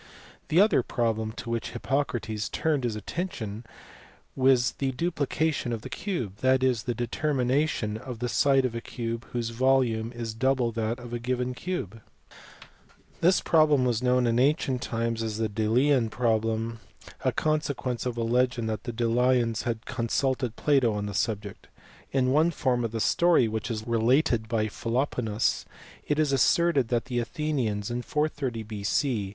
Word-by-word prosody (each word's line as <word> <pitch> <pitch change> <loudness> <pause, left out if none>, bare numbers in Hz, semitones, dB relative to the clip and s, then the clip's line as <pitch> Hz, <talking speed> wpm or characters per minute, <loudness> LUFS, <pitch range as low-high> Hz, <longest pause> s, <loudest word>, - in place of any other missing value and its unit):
The 165 - +3
other 205 -8 +5
problem 110 -2 -1
to 115 0 -6
which 115 -1 -3
Hippocrates 120 -4 -2
turned 150 -5 0
his 115 -3 -1
atten 170 - -3
tion 110 +1 -6 0.7
was 130 -2 +4
the 135 -1 0
duplication 155 -2 -1
of 115 -2 -4
the - - -8
cube, 170 - -3
that 130 +2 +2
is, 125 -4 +1
the 120 - 0
determination 125 -2 0
of 125 +1 -7
the 120 +2 -2
side 135 +1 +3
of 125 - -2
a 115 - -4
cube 115 0 -5
whose 120 -1 -3
volume 120 -2 +2
is 115 -2 -5
double 125 0 +1
that 115 +1 -2
of 120 -1 -9
a 120 - -2
given 125 +1 -2
cube. 125 - -5 1.2
Th 180 +3 +4
Mem 150 -5 +5
was 120 -2 +1
known 125 0 +3
in 115 0 +2
ancient 135 -2 +2
times 115 -1 -2
as 110 -1 -3
the 110 0 0
Delian 115 +4 +2
proble 115 0 0 0.2
} - - -17
jirn - - +1
consequence 145 -5 -1
of 120 -1 -3
a 115 - 0
legend 125 0 +1
that 110 - -4
the 120 - -4
Delians 120 0 +1
had 115 -2 -3
consul 130 +2 0
teu 130 -1 -2
Jr 115 - -15
lato 135 -7 +3
on 105 0 -2
the 100 - -4
subject. 105 0 -3 0.4
In 130 -1 +2
one 155 +4 +4
form 130 -7 0
of 115 - -2
the 115 - -3
story, 170 +1 +4
which 110 +1 -3
is 110 -2 -4
related 120 +1 +2
by 110 -1 0
Philoponus, 115 0 -1 0.4
it 150 - +1
is 155 -2 +2
asserted 140 +1 +3
that 120 0 0
the 125 -1 -2
Athenians 120 -6 -2
in 120 +1 -2
430 140 -5 -2
B.C. 105 +1 -1
120 Hz, 170 wpm, -27 LUFS, 115-135 Hz, 1.2 s, other